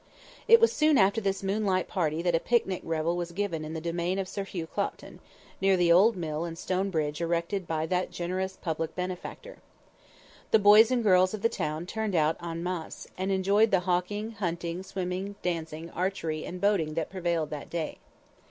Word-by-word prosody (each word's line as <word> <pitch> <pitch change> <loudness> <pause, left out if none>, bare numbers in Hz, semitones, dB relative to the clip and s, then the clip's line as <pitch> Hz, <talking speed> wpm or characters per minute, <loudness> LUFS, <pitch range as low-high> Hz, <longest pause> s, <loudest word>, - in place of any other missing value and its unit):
It 460 0 +8
was 460 - +4
soon 305 -2 +4
after 200 +3 +3
this 195 -1 -1
moonlight 195 -2 0
party 165 -4 -1
that 175 -1 +1
a 165 - +3
picnic 195 -3 0
revel 165 +1 -1
was 175 -1 -3
given 180 -4 -2
in 155 +1 -6
the - - -2
domain 170 +3 -2
of 195 -1 -2
Sir 200 +1 -4
Hugh 175 -4 -5
Clopton, - - -4 0.4
near 195 -1 +4
the 175 -1 +3
old 200 +7 +6
mill 160 -3 -3
and 165 -1 -5
stone 190 +3 -1
bridge 155 -3 -2
erected 170 +3 -1
by 160 -1 -1
that 180 +2 -1
generous 185 +2 -3
public 160 -1 -3
benefactor. 185 - -6 0.9
The - - +6
boys 210 +2 +7
and 250 -2 +1
girls 185 -1 +4
of 210 - -10
the 230 - +4
town 155 -2 -3
turned 215 0 -3
out 155 0 +3
en 165 0 -4
masse, 180 -2 -5
and 190 +1 -2
enjoyed 200 +3 +3
the 190 -3 +3
hawking, 185 +5 -1
hunting, 175 -4 -3
swimming, 190 +1 -4
dancing, 165 -1 -3
archery 170 -4 -2
and 180 - -6
boating 180 -7 +1
that 165 -2 -2
prevailed 170 -4 -1
that 150 -2 -6
day. 165 -2 -4
180 Hz, 190 wpm, -28 LUFS, 165-195 Hz, 0.9 s, It